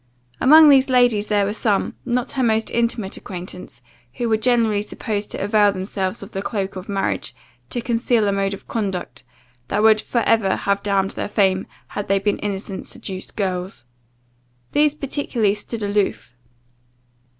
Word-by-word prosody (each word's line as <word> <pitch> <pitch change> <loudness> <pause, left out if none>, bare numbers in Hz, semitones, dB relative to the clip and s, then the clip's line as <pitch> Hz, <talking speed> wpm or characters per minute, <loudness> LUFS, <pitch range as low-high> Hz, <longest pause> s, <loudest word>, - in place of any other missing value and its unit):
Among 310 +4 +8
these 270 -1 +5
ladies 245 -5 +3
there 205 -1 +2
were 205 - -2
some, 210 -2 0
not 245 0 -1
her 270 - -2
most 225 -2 +1
intimate 230 -4 -1
acquaintance, 180 -8 -8 0.3
who 240 - -2
were 220 - +4
generally 225 -3 +2
supposed 210 -1 -4
to - - -4
avail 205 0 +4
themselves 190 0 -3
of 200 - -11
the 195 - -4
cloke 195 -2 -3
of 185 +1 -8
marriage, 195 -1 -2 0.3
to 240 - -2
conceal 235 -2 +1
a - - +2
mode 195 0 0
of - - -17
conduct, 195 -5 -4 0.4
that 210 +9 0
would 220 -1 +5
for 235 - -1
ever 220 -4 +2
have 200 0 0
damned 195 -1 +1
their - - -4
fame, 190 -3 +1 0.2
had 205 - -5
they 195 - +3
been 200 +1 0
innocent, 195 -1 -4
seduced 190 -1 -7
girls. 185 - -3 0.9
These 300 0 +3
particularly 265 -7 0
stood 215 +1 -5
aloof. 205 -7 -1
205 Hz, 160 wpm, -21 LUFS, 195-235 Hz, 0.9 s, Among